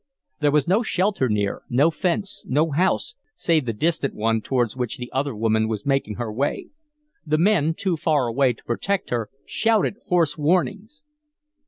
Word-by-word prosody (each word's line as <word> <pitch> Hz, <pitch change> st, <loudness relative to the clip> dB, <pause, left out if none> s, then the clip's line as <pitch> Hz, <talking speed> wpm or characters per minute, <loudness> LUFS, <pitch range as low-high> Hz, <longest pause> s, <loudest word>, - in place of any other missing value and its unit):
There 150 Hz, -, +3 dB
was 145 Hz, -1 st, +2 dB
no 195 Hz, +6 st, +3 dB
shelter 190 Hz, -, 0 dB
near, 105 Hz, -2 st, -1 dB
no 140 Hz, +7 st, +3 dB
fence, 185 Hz, +4 st, -2 dB
no 150 Hz, +4 st, +1 dB
house, 185 Hz, +9 st, +1 dB, 0.2 s
save 160 Hz, -6 st, +1 dB
the -, -, +1 dB
distant 155 Hz, +4 st, -1 dB
one 110 Hz, +1 st, +1 dB
towards 120 Hz, -1 st, 0 dB
which 125 Hz, -3 st, -3 dB
the 125 Hz, 0 st, -7 dB
other 135 Hz, -1 st, -1 dB
woman 110 Hz, 0 st, +1 dB
was 110 Hz, -2 st, -4 dB
making 135 Hz, -6 st, 0 dB
her 115 Hz, -1 st, -4 dB
way. 135 Hz, +6 st, -2 dB, 0.5 s
The 155 Hz, 0 st, +1 dB
men, 165 Hz, -3 st, +3 dB
too 185 Hz, -2 st, -1 dB
far 150 Hz, -4 st, +1 dB
away 125 Hz, +2 st, +2 dB
to -, -, -21 dB
protect 195 Hz, +11 st, -2 dB
her, 115 Hz, -3 st, -1 dB, 0.2 s
shouted 220 Hz, -2 st, +1 dB
hoarse 170 Hz, -4 st, +1 dB
warnings. 200 Hz, -, 0 dB
145 Hz, 170 wpm, -23 LUFS, 120-180 Hz, 0.5 s, There